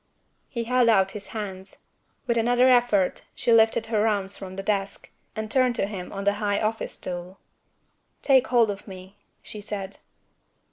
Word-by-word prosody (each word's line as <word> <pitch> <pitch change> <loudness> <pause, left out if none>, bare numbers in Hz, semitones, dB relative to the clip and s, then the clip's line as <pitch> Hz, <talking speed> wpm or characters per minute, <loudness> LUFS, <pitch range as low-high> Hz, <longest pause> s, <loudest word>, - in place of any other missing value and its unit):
He 235 -2 -3
held 245 0 +3
out 195 -3 +3
his 205 -1 -8
hands. 195 -3 -7 0.5
With 235 - 0
another 245 +2 +3
effort, 240 -7 +2
she 235 - +1
lifted 225 0 +4
her 220 -1 +1
arms 200 -2 -1
from 190 -1 -8
the 195 - -5
desk, 200 -1 -3 0.2
and 220 0 -5
turned 255 -1 +2
to - - 0
him 195 -3 -7
on 200 0 -5
the 200 0 +2
high 205 -1 +1
office 220 +1 -2
stool. 180 +1 -7 0.9
"Take 265 -2 +4
hold 235 -4 +3
of 200 +1 -9
me," 190 +1 -11 0.2
she 210 - -9
said. 200 -2 -6
210 Hz, 170 wpm, -25 LUFS, 195-230 Hz, 0.9 s, lifted